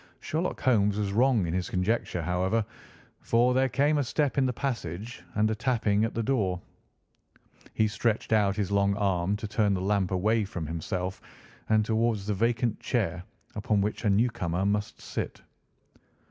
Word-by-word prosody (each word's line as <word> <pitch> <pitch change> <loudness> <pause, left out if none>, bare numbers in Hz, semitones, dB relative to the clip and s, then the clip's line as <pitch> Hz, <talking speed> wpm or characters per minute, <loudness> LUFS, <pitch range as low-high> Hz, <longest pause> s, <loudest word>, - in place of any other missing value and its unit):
Sherlock 165 +4 -2
Holmes 105 -6 +3
was 100 -2 -1
wrong 120 -3 +3
in 85 - -3
his 90 0 -1
conjecture, 90 -2 -1
however, 95 +6 0 0.5
for 120 +2 +2
there 130 +1 +2
came 145 +3 +2
a - - +2
step 145 +2 0
in 130 - +3
the - - +1
passage 115 - -4
and 110 +1 +2
a - - +1
tapping 110 -3 +1
at 115 - -4
the 115 - 0
door. 100 -8 0 1.2
He 110 - +3
stretched 110 +1 -1
out 100 -3 +3
his 100 -1 -2
long 100 0 +2
arm 95 -1 +1
to 105 +1 -5
turn 105 -1 +1
the - - -2
lamp 100 -1 +1
away 105 +4 +1
from 90 -5 -5
himself 90 +4 -4 0.5
and 110 -1 +3
towards 110 -2 0
the 105 - 0
vacant 115 +2 0
chair 95 -7 -1 0.3
upon 105 0 0
which 105 +4 -2
a 105 - +2
newcomer 100 -4 +1
must 105 +1 -1
sit. - - -5
105 Hz, 170 wpm, -28 LUFS, 95-115 Hz, 1.2 s, Holmes